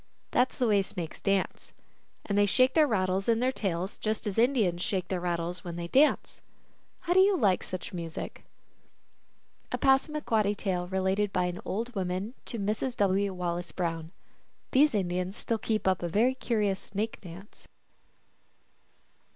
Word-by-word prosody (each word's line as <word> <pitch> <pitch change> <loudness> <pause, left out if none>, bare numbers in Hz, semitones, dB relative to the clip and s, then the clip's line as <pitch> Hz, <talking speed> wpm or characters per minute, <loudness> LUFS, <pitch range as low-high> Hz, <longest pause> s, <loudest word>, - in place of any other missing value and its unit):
That 250 +1 +3
s - - -13
the 250 - +2
way 205 -2 +4
snakes 175 -4 -6
dance. 195 -1 -1 0.5
And 200 - -1
they 205 0 +4
shake 255 +5 +4
the 310 -2 +5
rattles 190 -3 0
in 230 -1 +3
their 255 +2 +2
tails 190 -5 -3
just 215 0 -2
as 205 +1 -1
Indians 225 -9 +2
shake 185 -2 -2
their 185 - -1
rattles 175 0 -2
when 175 -2 -6
they 170 0 -4
dance. 280 - +2 0.6
How 350 - 0
do 370 - +5
you 385 0 +5
like 200 - +3
such 185 +2 -6
music? 165 -2 -6 1.3
A - - 0
Passamaquoddy 265 -7 +2
tale 180 -3 -2
related 190 +2 0
by 180 -2 +1
an 180 0 -4
old 230 +5 -3
woman 190 +2 -2
to 235 - -4
Mrs. 215 +5 -2
W. 200 0 +2
Wallace 175 -1 -3
Brown. 165 -2 -3 0.6
These 285 -1 +4
Indians 185 0 -1
still 230 -1 -2
keep 215 -1 -1
up 185 -2 +2
a 175 - -2
very 230 +9 +3
curious 210 -7 0
snake 210 +3 -4
dance. 185 +2 -12
200 Hz, 160 wpm, -29 LUFS, 180-230 Hz, 1.3 s, the